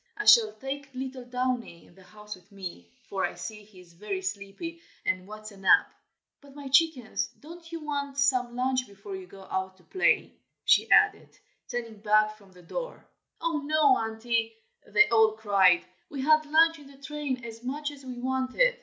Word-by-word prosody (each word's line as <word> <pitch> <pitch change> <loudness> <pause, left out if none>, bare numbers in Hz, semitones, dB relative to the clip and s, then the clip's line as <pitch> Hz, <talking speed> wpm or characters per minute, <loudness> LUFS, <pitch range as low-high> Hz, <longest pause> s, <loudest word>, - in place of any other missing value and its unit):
I 420 - -3
shall 440 -3 +7
take 275 +1 -6
little 260 -1 -6
Downy 250 -7 -3
in - - -21
the 190 - -19
house 210 +2 -10
with 185 +2 -22
me, 175 - -8 0.2
for 195 - -2
I - - -1
see 215 -1 -7
he 205 -2 -18
is 175 -1 -19
very 195 +1 -5
sleepy, 200 - -5 0.2
and 185 0 -1
wants 215 +1 -9
a 200 - -14
nap. 190 -1 +4 0.5
But, 280 -1 -17
my 285 -2 -8
chickens, 275 -5 +2
don't 330 +2 -12
you 330 -1 -5
want 280 -2 -3
some 255 -4 +2
lunch 255 0 0
before 200 0 -9
you 190 -1 -9
go 195 +1 -13
out 190 0 -3
to 180 - -23
play?" 375 - +1 0.3
she - - +4
added, - - +4 0.3
turning 230 -4 -5
back 215 0 +3
from 200 -3 -20
the 180 -1 -17
door. - - -6 0.4
"Oh! 330 -2 0
no, 295 -2 +4
Auntie!" 225 0 -1 0.3
they 210 0 +5
all 220 -2 +5
cried. 200 -5 +4 0.2
"We 280 -3 -5
had 310 +1 +4
lunch 325 +1 +4
in 285 - -14
the 275 0 -16
train, 275 -3 -4
as 230 0 -9
much 290 +4 -3
as 280 -1 -13
we 255 -1 -7
wanted." 260 - +1
245 Hz, 190 wpm, -28 LUFS, 205-285 Hz, 0.5 s, shall